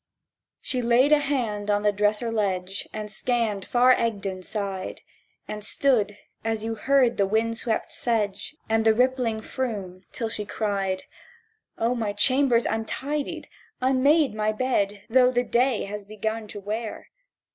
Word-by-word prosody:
She 255 -3 -1
laid 245 +4 +4
a 300 - +7
hand 235 -8 -1
on 205 0 +2
the 210 - +4
dresser 210 +3 0
ledge, 195 -3 -1
And 215 -1 -5
scanned 220 -5 -1
far 250 +1 +5
Egdon 200 -6 -1
side; 195 -1 -4 0.5
And 210 0 -6
stood; 215 -3 +2 0.3
and 225 -1 -1
you 225 +1 -3
heard 255 +2 +2
the 200 - +3
wind 225 +2 0
swept 225 -2 -1
sedge 210 +1 -1
And 225 0 +2
the 220 -1 +4
rippling 250 -3 +1
Froom; 205 -9 -4
till 230 - -3
she 210 - -4
cried: 200 -3 -2 0.7
"O 230 +2 +1
my 220 -4 -2
chamber's 250 +2 +3
untidied, 275 +6 -3 0.3
unmade 265 +1 +3
my 215 0 0
bed 210 -4 0
Though 250 +1 +5
the 245 -1 +1
day 245 0 +1
has 205 +1 -6
begun 215 +2 -4
to 205 - -7
wear! 215 +3 -5
220 Hz, 145 wpm, -25 LUFS, 205-250 Hz, 0.7 s, a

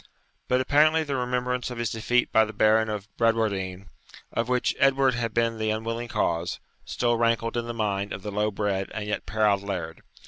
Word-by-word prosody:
But 125 0 +2
apparently 155 +4 +4
the 145 -2 -3
remembrance 125 0 -1
of 125 - -7
his 115 -1 -2
defeat 120 +2 +1
by 110 - +5
the 110 0 -5
Baron 110 +1 +3
of 105 -1 -4
Bradwardine, 100 -5 0 0.5
of 115 +1 -1
which 125 -1 +1
Edward 135 -1 +4
had 115 -1 -2
been 115 0 0
the 110 0 0
unwilling 115 +2 -2
cause, 85 -5 -1 0.3
still 120 -1 0
rankled 115 0 +1
in 120 -1 -2
the 120 - -3
mind 100 -2 -1
of 95 - -6
the 105 - -4
low 105 +1 0
bred 100 -2 -2
and 110 -2 -3
yet 105 - -3
proud 105 -2 +2
laird. 90 -5 -5
115 Hz, 195 wpm, -26 LUFS, 105-120 Hz, 0.5 s, by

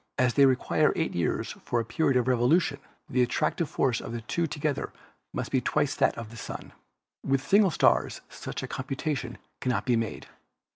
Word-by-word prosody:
As 125 -1 +3
they 140 -1 +6
require 135 +4 +2
8 160 - -1
years 85 -3 -1
for 120 - 0
a 115 - -2
period 135 +2 +1
of 125 0 +1
revolution, 130 +8 +3 0.3
the 130 -4 +1
attractive 155 +5 0
force 125 -4 +1
of 115 - -6
the 120 - -4
two 170 +9 -1
to 145 - -6
gether 145 -1 -1 0.4
must - - -4
be - - +2
twice - - +1
that - - +2
of 115 -2 -7
the 115 - -10
Sun. - - -7 0.5
With 135 0 0
single 200 0 +5
stars - - +2
such - - -6
a - - -3
computation 135 -1 -3 0.2
cannot 125 -1 -1
be 125 -2 +3
made. 115 -2 -2
130 Hz, 190 wpm, -28 LUFS, 120-150 Hz, 0.5 s, they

